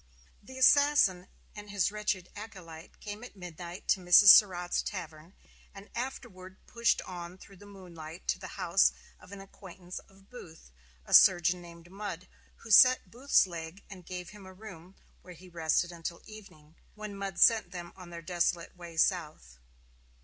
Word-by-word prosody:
The 260 +5 -13
assassin 260 -9 +4 0.3
and 210 0 -10
his 200 -1 0
wretched 210 -4 -3
acolyte 185 -7 -12
came 210 +2 -8
at 245 - -12
midnight 175 -1 -10
to 195 - +3
Mrs. 180 +3 +7
Surratt's 180 -3 +5
tavern, 165 -1 -8 0.4
and 195 +1 -13
afterward 190 -7 -7
pushed 235 -1 0
on 175 0 -9
through 195 +1 -16
the 205 - -15
moonlight 175 -4 -12
to - - 0
the - - -8
house - - +2 0.3
of - - -17
an 200 - -9
acquaintance 185 -2 -11
of 195 0 -23
Booth, 165 - -14 0.3
a - - -7
surgeon 175 0 +5
named 170 0 -14
Mudd, 190 -3 -7 0.4
who 225 - -9
set 255 +4 +6
Booth's 260 +1 +2
leg 170 +1 -9
and 185 -2 -11
gave 180 0 -8
him 205 -2 -14
a 190 - -12
room, 185 -2 -13 0.3
where 180 -1 -13
he 185 +3 -16
rested 170 +1 -1
until 170 0 -8
evening, 165 -8 -15 0.2
when 215 -1 -8
Mudd 195 -1 -6
sent 225 -6 +4
them 175 -1 -9
on 180 -2 -13
their 170 -1 -10
desolate 175 0 -2
way 170 -2 -12
south. 155 - -1
185 Hz, 165 wpm, -29 LUFS, 170-205 Hz, 0.4 s, Mrs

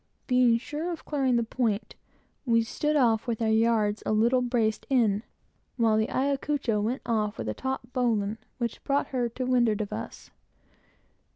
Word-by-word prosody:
Being 250 -2 +4
sure 300 +8 -4
of 335 - -7
clearing 270 -4 +1
the 235 - +2
point, 225 -2 -2 0.5
we 230 -4 +3
stood 300 +6 -1
off 235 -4 +2
with 230 -2 -1
our 225 -1 +1
yards 220 -2 +2
a - - -1
little 235 +4 +3
braced 230 -3 0
in, 220 -6 +2 0.6
while 225 -3 +3
the 220 0 +1
Ayacucho 275 -4 0
went 235 +5 -2
off 215 -2 -1
with - - -5
a - - -1
taut 265 -2 -5
bowline, 225 -4 0 0.2
which 235 -2 -4
brought 280 0 0
her 245 -3 -1
to 255 +3 -4
windward 240 -4 +2
of 210 -2 -3
us. - - -7
235 Hz, 170 wpm, -27 LUFS, 220-260 Hz, 0.6 s, Being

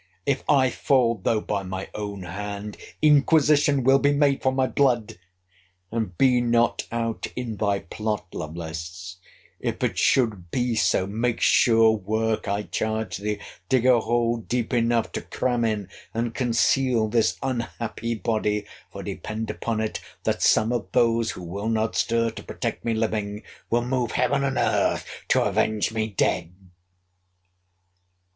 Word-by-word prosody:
If 140 -1 0
I 130 -3 +4
fall, 120 -6 +2
though 110 -2 +1
by 105 -2 -2
my 95 0 -5
own 100 -2 -5
hand, 100 +3 -6 0.3
inquisition 145 -2 +4
will 135 +2 +5
be 145 +1 +3
made 145 -1 +2
for 130 - +2
my 130 0 +1
blood; 120 -7 +1 0.7
and 110 -6 -3
be 125 -2 +4
not 120 -1 +1
out 115 -1 -2
in 120 -3 -4
thy 100 -1 0
plot, 105 +4 -3
Lovelace, 80 +3 -6 0.4
if - - -3
it - - 0
should 105 -9 +2
be 125 +4 0
so—make 110 +3 +1
sure 115 -3 +5
work, 110 +1 -1
I 100 +1 -1
charge 110 -2 -2
thee—dig 105 +5 -2
a 125 -2 +6
hole 120 +1 +1
deep 120 +1 -3
enough 115 -1 +1
to - - -4
cram 120 -2 -1
in 105 -4 -1 0.3
and 115 0 -1
conceal 120 -1 +2
this 115 0 +1
unhappy 115 -2 -3
body; 105 -2 -1 0.3
for, - - -7
depend 110 0 -4
upon 110 +1 -3
it, 110 - -3 0.2
that - - -1
some 110 +2 +4
of 120 - -2
those 115 -1 +3
who 90 - -9
will 100 +6 -4
not 110 -1 0
stir 115 0 +1
to - - -9
protect - - -4
me 115 -1 0
living, 105 -1 -2 0.3
will 120 +1 +1
move 125 -2 -1
heaven 135 +2 +1
and 135 -1 -1
earth - - +1 0.2
to - - +3
avenge 110 0 +1
me 110 -1 0
dead! 90 -5 0
115 Hz, 150 wpm, -24 LUFS, 105-120 Hz, 0.7 s, a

